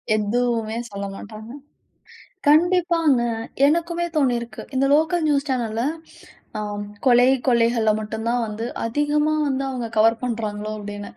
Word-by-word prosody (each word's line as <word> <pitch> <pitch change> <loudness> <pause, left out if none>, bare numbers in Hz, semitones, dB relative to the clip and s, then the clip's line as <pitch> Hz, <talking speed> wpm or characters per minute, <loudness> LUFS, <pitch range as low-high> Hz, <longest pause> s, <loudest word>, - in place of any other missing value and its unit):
எதுவுமே 225 +1 0
சொல்லமாட்டாங்க. 200 +3 -7 1.0
கண்டிப்பாங்க 330 -3 +3 0.5
எனக்குமே 340 +2 0
தோணியிருக்கு. 240 -5 0
இந்த 270 +1 +2
லோக்கல் 320 +2 +2
நியூஸ் 285 0 +1
சேனல்ல 230 -3 -1 0.8
அ - - -2 0.4
கொலை 245 -1 +6 0.2
கொள்ளைகள்ல 235 -2 +3
மட்டும் 220 +1 -5
தான் 245 0 +1
வந்து 215 +2 -5 0.2
அதிகமா 295 +5 +1
வந்து 275 0 -1
அவங்க 245 -3 -4
கவர் 225 +2 +4
பண்ணுறாங்களோ 215 -3 -3
அப்படின்னு. 205 0 -7
240 Hz, 115 wpm, -22 LUFS, 220-295 Hz, 1.0 s, கொலை